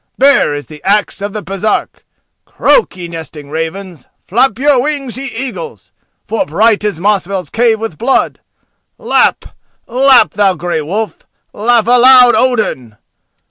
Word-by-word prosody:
Bare 275 - +3
is 145 - -6
the 150 -2 -13
axe 205 +1 0
of 205 +1 -4
the 215 0 -6
Baresark! 195 +4 -3 0.4
Croak, 485 - +1
ye 175 -1 -7
nesting 160 -3 -9
ravens; 165 -1 -6 0.2
Flap 240 +2 +1
your 275 -1 +2
wings, 280 -3 -3
ye 270 +2 -5
eagles, 270 - -7 0.3
For 225 - -1
bright 210 +8 +1
is 205 -6 -2
Mosfell's 190 -3 -1
cave 230 -1 +1
with 225 -8 -6
blood! 265 +4 0 0.6
Lap! 480 0 +1 0.4
lap! 260 +1 +4
thou 195 -2 +1
Grey 175 -1 -3
Wolf, 205 +8 -5 0.3
Laugh 230 +1 +1
aloud, 250 +1 +6
Odin! 210 - -1
210 Hz, 140 wpm, -13 LUFS, 175-250 Hz, 0.6 s, aloud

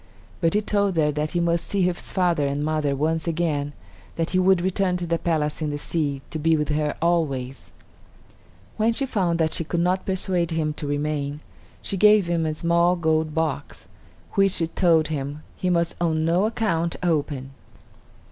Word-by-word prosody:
But 165 +2 +1
he 210 - +3
told 200 -3 0
her 150 -1 +3
that 150 +2 -2
he 175 - +1
must 170 0 +1
see 200 -2 0
his 180 -1 -1
father 175 -6 +1
and 140 +2 -2
mother 155 -2 0
once 160 +3 -1
again; 155 -4 -1 0.4
then 165 - 0
he 185 - +2
would 185 0 +4
return 185 0 0
to 175 - -4
the 170 0 -1
palace 155 -2 -1
in 155 - -1
the 145 - -3
sea, 145 -3 -2
to 155 - -4
be 160 +1 +3
with 150 0 -1
her 150 0 0
always. 140 -7 -1 1.1
When 225 +2 +2
she 275 +4 +2
found 185 -9 0
that 160 -1 +1
she - - 0
could 170 +2 -2
not 180 +2 0
persuade 185 -3 0
him 160 -2 -1
to 150 - -5
remain, 145 0 -2 0.4
she 195 - -3
gave 210 0 +6
him 170 -2 0
a 155 - -2
small 170 +2 +2
gold 160 -2 0
box, 150 -3 -3 0.4
which, 195 -1 +3
she 165 - +1
told 160 -2 +2
him, 145 0 -4
he 185 - -2
must 170 -1 +1
on 160 -2 +1
no 175 +5 +2
account 170 -7 -1
open. 145 -5 -1
165 Hz, 185 wpm, -24 LUFS, 150-180 Hz, 1.1 s, gave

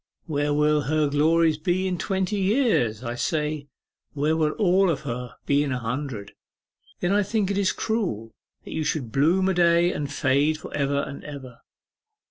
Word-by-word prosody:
"Where 145 -2 -1
will 150 +1 +3
her 150 +1 +1
glories 160 +1 +3
be 180 +4 0
in 180 -2 -2
twenty 190 +4 -1
years?" 190 - +1
I 120 -1 -3
say. 150 +2 -2 0.5
"Where 150 +2 +1
will 155 -1 +1
all 190 -2 +3
of 160 - -1
her 125 -3 -5
be 140 0 +3
in 145 -2 -1
a 130 - -1
hundred?" 120 -3 -4 0.7
Then 175 - +1
I 205 +1 +3
think 205 -1 0
it 200 - -1
is 195 -2 +2
cruel 175 - -2 0.3
that - - -9
you 160 - -1
should 150 -6 -2
bloom 170 +9 +3
a 190 - +2
day, 170 0 +3
and 145 -1 -4
fade 145 +3 +2
for 155 - -10
ever 140 0 0
and 140 - -7
ever. 130 -5 -9
150 Hz, 180 wpm, -25 LUFS, 140-180 Hz, 0.7 s, will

